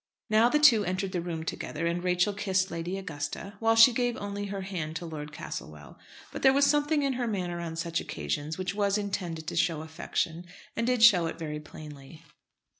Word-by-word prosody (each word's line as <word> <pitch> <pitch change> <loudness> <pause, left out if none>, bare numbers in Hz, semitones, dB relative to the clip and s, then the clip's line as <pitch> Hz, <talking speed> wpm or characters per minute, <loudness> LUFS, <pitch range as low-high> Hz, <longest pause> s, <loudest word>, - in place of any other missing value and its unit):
Now, 220 +2 +5
the 300 - +3
two 265 -9 +6
entered 185 +1 -2
the 180 -2 -2
room 165 -2 -4
together, 160 0 -4
and 170 +1 -1
Rachel 180 +3 +2
kissed 190 -2 0
Lady 170 +3 -3
Augusta, 160 +1 -5
while 225 0 +3
she 230 +2 +8
gave 245 0 0
only 205 -1 -4
her 200 0 -4
hand 170 -5 -4
to 170 - -4
Lord 150 -2 -7
Castlewell. 160 +3 -8 0.3
But - - -6
there 265 -1 +6
was 280 +1 +4
something 295 +1 +2
in 275 -1 +1
her 245 -1 -2
manner 180 -5 -2
on 165 -1 -5
such 165 0 -2
occasions 145 - -4
which 185 0 -2
was 200 0 +1
intended 180 -6 -3
to - - -5
show 165 -2 +1
affection, 160 +1 -3 0.3
and 230 0 -1
did 250 -3 +2
show 180 -8 +7
it 165 - -5
very 150 -2 -4
plainly. 150 0 -12
180 Hz, 200 wpm, -28 LUFS, 165-210 Hz, 0.3 s, she